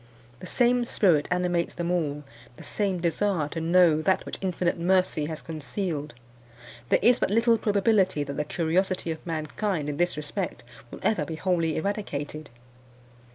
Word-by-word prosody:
The 185 - -8
same 245 +4 +3
spirit 175 -10 +2
animates 180 -1 0
them 170 +1 -2
all 150 -4 -1 0.3
the - - -11
same 195 -4 -1
desire 170 -1 0
to 165 - -4
know 165 -2 +4
that 190 +4 +1
which - - -6
Infinite 180 -2 -1
Mercy 180 -3 +2
has 160 -1 -6
concealed. 155 -2 -4 0.7
There - - +5
is 245 +1 +5
but - - +1
little 230 +2 +3
probability 200 -6 +2
that 140 0 -5
the 150 - -1
curiosity 170 +3 0
of 160 - -6
mankind 160 +1 -2
in 145 - -4
this 175 -1 +1
respect 150 -2 -4 0.3
will - - -10
ever 195 -9 +2
be 160 +2 -5
wholly 165 -2 0
eradicated. 155 -6 -4
175 Hz, 155 wpm, -26 LUFS, 155-190 Hz, 0.7 s, There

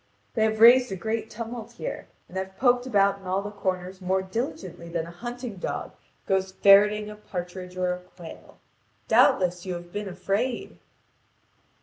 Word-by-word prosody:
They 220 -2 +2
have 220 0 0
raised 245 +1 +8
a - - -2
great 220 +3 -3
tumult 230 +1 -7
here, - - -6 0.2
and 180 - -14
have 190 0 -4
poked 245 -1 +3
about 200 -4 +3
in 190 - -12
all 190 +2 0
the 205 - -5
corners 185 -1 -3
more 190 +1 0
diligently 190 - -5
than 165 -1 -2
a 170 - -9
hunting 240 +3 -6
dog - - -4 0.3
goes 190 -1 0
ferreting 210 +2 +6
a - - -9
partridge 180 -2 -7
or 180 -1 +1
a 180 - -6
quail. 180 -2 -13 0.5
Doubtless 180 -1 +4
you 185 -2 -3
have 175 0 -9
been 205 -1 -3
afraid." 200 +7 -2
195 Hz, 165 wpm, -26 LUFS, 180-220 Hz, 0.5 s, raised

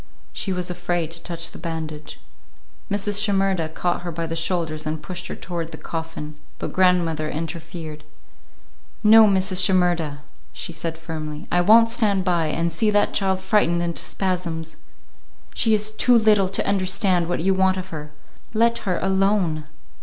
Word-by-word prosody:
She 195 - -3
was 180 -1 -2
afraid 175 -2 -2
to 170 0 -6
touch 170 -1 -3
the - - -11
bandage. 155 -2 -6 0.7
Mrs. 205 0 0
Shimerda 195 -5 +1
caught 175 +2 -2
her 175 -1 -5
by 165 +1 -3
the 165 0 -4
shoulders 165 -2 -2
and 155 +1 -2
pushed 180 0 -6
her - - -5
toward 170 -3 -5
the - - -8
coffin, 160 -2 -6 0.2
but - - -5
grandmother 170 -4 +2
interfered. 160 -1 -6 1.0
"No, 220 +1 +8
Mrs. 190 -1 +3
Shimerda," 175 -6 +1 0.3
she 170 - -5
said 165 +1 -4
firmly, 155 -2 -6
"I 175 - +3
won't 230 +5 +6
stand 205 -5 +1
by 170 -3 +1
and 170 +2 -1
see 210 +7 +1
that 205 0 +2
child 190 -1 +1
frightened 185 -3 +2
into 170 -1 -2
spasms. 170 -4 -3 0.8
She 220 -1 +3
is 210 +1 0
too 240 +3 +4
little 210 -4 +4
to 195 - -1
understand 190 -2 +1
what 175 - -1
you 190 +3 +2
want 190 0 +2
of 185 0 -5
her. 150 -3 -7 0.4
Let 235 +1 +3
her 180 - +1
alone." 190 -5 +1
175 Hz, 160 wpm, -22 LUFS, 165-195 Hz, 1.0 s, No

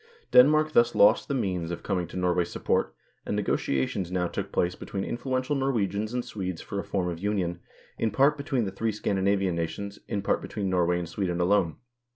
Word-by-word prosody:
Denmark 155 +4 +6
thus 120 -5 +4
lost 105 +3 +5
the 140 - -1
means 90 -8 -1
of 85 - -5
coming 90 -4 -1
to 90 - -8
Norway's 90 -1 +1
support, - - -1 0.3
and - - -2
negotiations 85 +7 -1
now 90 -1 0
took - - -5
place 90 0 +1
between 95 +1 -5
influential 130 +3 -2
Norwegians 110 -6 0
and 125 0 -2
Swedes 95 -4 -4
for 100 - -5
a - - -3
form 95 -3 -1
of 85 -2 -4
union, 95 -3 -1 0.4
in 115 - +1
part 135 +8 +3
between 140 -5 -1
the 95 - -3
three 110 +3 -1
Scandinavian 100 -2 0
nations, 100 +5 -4
in 100 -1 -2
part - - +1
between 100 -3 -3
Norway 90 -1 +2
and 90 -1 -3
Sweden 90 0 -2
alone. 90 -2 +2
100 Hz, 190 wpm, -27 LUFS, 90-115 Hz, 0.4 s, Denmark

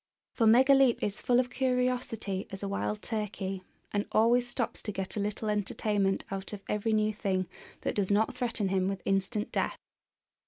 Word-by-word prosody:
For 225 - +3
Megaleep 265 +2 +5
is 205 0 -2
full 245 0 +3
of 250 0 0
curiosity 250 -6 -1
as 195 +1 -7
a - - -1
wild 205 +1 -2
turkey, 200 -4 -3 0.3
and 205 0 -1
always 240 +3 +4
stops 240 -1 -3
to 210 - -4
get 190 -1 -4
a - - -1
little 210 +2 -2
entertainment 205 -1 0
out 195 +1 -5
of 200 -1 -7
every 210 +2 0
new 215 0 +2
thing 190 -3 -1 0.3
that - - -1
does 200 -3 0
not 210 +2 +2
threaten 230 -5 -1
him 190 -1 +1
with 195 -1 -3
instant 195 +3 0
death. - - -1
210 Hz, 175 wpm, -30 LUFS, 195-235 Hz, 0.3 s, Megaleep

